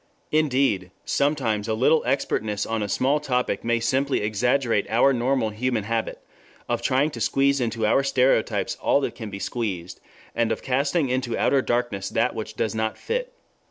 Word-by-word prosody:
Indeed, 135 Hz, -11 st, +1 dB, 0.2 s
sometimes 125 Hz, -8 st, 0 dB
a 110 Hz, -, 0 dB
little 135 Hz, +7 st, +3 dB
expertness 105 Hz, -6 st, -1 dB
on 115 Hz, -1 st, -2 dB
a 105 Hz, -, -2 dB
small 140 Hz, +7 st, +2 dB
topic 125 Hz, -7 st, -1 dB
may 115 Hz, 0 st, +1 dB
simply 130 Hz, +4 st, 0 dB
exaggerate 115 Hz, +1 st, +1 dB
our 120 Hz, +5 st, +4 dB
normal 125 Hz, -1 st, +1 dB
human 115 Hz, 0 st, -1 dB
habit 115 Hz, +1 st, -2 dB, 0.5 s
of 120 Hz, -1 st, -1 dB
trying 135 Hz, +5 st, +1 dB
to -, -, -7 dB
squeeze 140 Hz, 0 st, +2 dB
into 115 Hz, -2 st, -1 dB
our 110 Hz, +5 st, +3 dB
stereotypes 125 Hz, -6 st, +1 dB
all -, -, +2 dB
that -, -, -2 dB
can 110 Hz, -4 st, -7 dB
be 100 Hz, -, -6 dB
squeezed, 95 Hz, -6 st, -4 dB, 0.3 s
and 115 Hz, -1 st, 0 dB
of -, -, -3 dB
casting 140 Hz, +3 st, +1 dB
into 125 Hz, -2 st, -1 dB
outer 140 Hz, -, +3 dB
darkness 120 Hz, -6 st, -1 dB
that 115 Hz, +3 st, +1 dB
which 110 Hz, 0 st, -6 dB
does 110 Hz, 0 st, -1 dB
not 110 Hz, 0 st, -2 dB
fit. -, -, -3 dB
120 Hz, 170 wpm, -24 LUFS, 110-135 Hz, 0.5 s, our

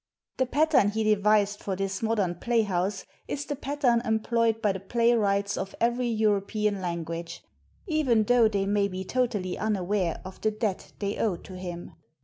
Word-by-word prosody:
The 260 Hz, -, +1 dB
pattern 290 Hz, -6 st, +3 dB
he 220 Hz, +1 st, -1 dB
devised 210 Hz, -1 st, +2 dB
for 195 Hz, -, -2 dB
this 195 Hz, 0 st, -3 dB
modern 215 Hz, -6 st, +1 dB
playhouse 195 Hz, -2 st, 0 dB, 0.2 s
is 285 Hz, -, -3 dB
the 290 Hz, -, -3 dB
pattern 265 Hz, -4 st, +1 dB
employed 225 Hz, 0 st, +1 dB
by 210 Hz, -3 st, +2 dB
the 190 Hz, -, -4 dB
playwrights 200 Hz, -2 st, +1 dB
of 195 Hz, -, -4 dB
every 240 Hz, +1 st, +1 dB
European 210 Hz, -2 st, 0 dB
language, 170 Hz, -1 st, -4 dB, 0.4 s
even 295 Hz, -, +2 dB
though 240 Hz, +1 st, +5 dB
they 200 Hz, -2 st, 0 dB
may 200 Hz, 0 st, +2 dB
be 190 Hz, -1 st, -5 dB
totally 210 Hz, -5 st, -1 dB
unaware 195 Hz, -4 st, 0 dB
of 185 Hz, -, -10 dB
the 215 Hz, -, +2 dB
debt 215 Hz, -3 st, -3 dB
they 200 Hz, 0 st, -3 dB
owe 210 Hz, -5 st, +1 dB
to 185 Hz, -, -12 dB
him. 175 Hz, -1 st, -7 dB
210 Hz, 160 wpm, -27 LUFS, 195-230 Hz, 0.4 s, though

